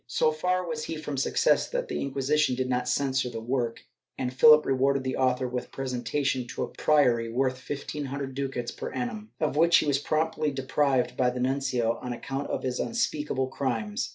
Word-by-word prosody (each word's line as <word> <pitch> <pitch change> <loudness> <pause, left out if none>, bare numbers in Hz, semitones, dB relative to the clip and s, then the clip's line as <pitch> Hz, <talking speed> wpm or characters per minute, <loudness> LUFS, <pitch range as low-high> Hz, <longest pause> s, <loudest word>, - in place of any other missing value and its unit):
So 155 +5 +2
far 180 +4 0
was 155 -2 -3
he 165 - -4
from 150 -2 -5
success 460 - +2
that - - -2
the - - -3
Inquisition 140 0 +1
did 130 0 -1
not 125 0 -1
censure 130 -1 +1
the 115 -1 -5
work, 120 0 -2 0.4
and 125 0 -2
Philip 150 +3 +7
rewarded 135 0 +2
the 130 - -2
author 130 -1 +1
with 125 0 -5
presentation 130 0 -2
to - - -4
a - - -2
priory 125 -7 +2
worth 130 +1 0
fifteen 145 +2 -5
hundred 135 0 -4
ducats 130 -3 -3
per - - -6
annum, 110 -4 -4
of - - 0
which 170 +2 +6
he - - +2
was 140 -2 +2
promptly 155 +1 0
deprived 135 -1 0
by 125 -1 +2
the 125 0 -4
nuncio, 125 -3 0
on 125 -1 -4
account 135 +3 -4
of - - -2
his 125 -1 -2
unspeakable 150 - -1
crimes. 115 -6 -2
135 Hz, 190 wpm, -27 LUFS, 125-145 Hz, 0.4 s, Philip